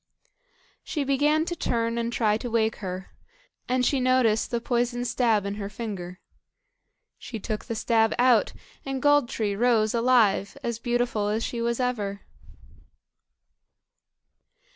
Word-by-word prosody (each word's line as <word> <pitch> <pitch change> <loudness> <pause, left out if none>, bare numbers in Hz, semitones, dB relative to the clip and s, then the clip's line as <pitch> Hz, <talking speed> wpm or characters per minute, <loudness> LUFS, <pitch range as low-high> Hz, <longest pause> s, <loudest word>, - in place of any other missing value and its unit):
She 295 - -2
began 295 +3 +2
to 345 - -3
turn 230 -5 -1
and 235 0 -2
try 215 -3 +2
to 240 +3 -4
wake 225 -1 +1
her, 185 -1 -6 0.6
and 250 0 +2
she 275 - +2
noticed 250 -4 +2
the 235 - -1
poisoned 245 +1 -1
stab 225 -6 +1
in 200 - -2
her 200 - -4
finger. 195 -5 -6 1.0
She 225 - -7
took 215 +1 -4
the 230 - -4
stab 225 0 +2
out, 245 -2 +4 0.3
and 270 -1 -3
Gold 290 -3 +3
tree 205 -3 -2
rose 220 -1 +2
alive, 230 -5 +2
as 235 -1 -3
beautiful 240 -3 0
as 215 +2 -1
she 235 - -3
was 235 +1 -1
ever. 210 -6 -2
235 Hz, 140 wpm, -26 LUFS, 215-250 Hz, 1.0 s, out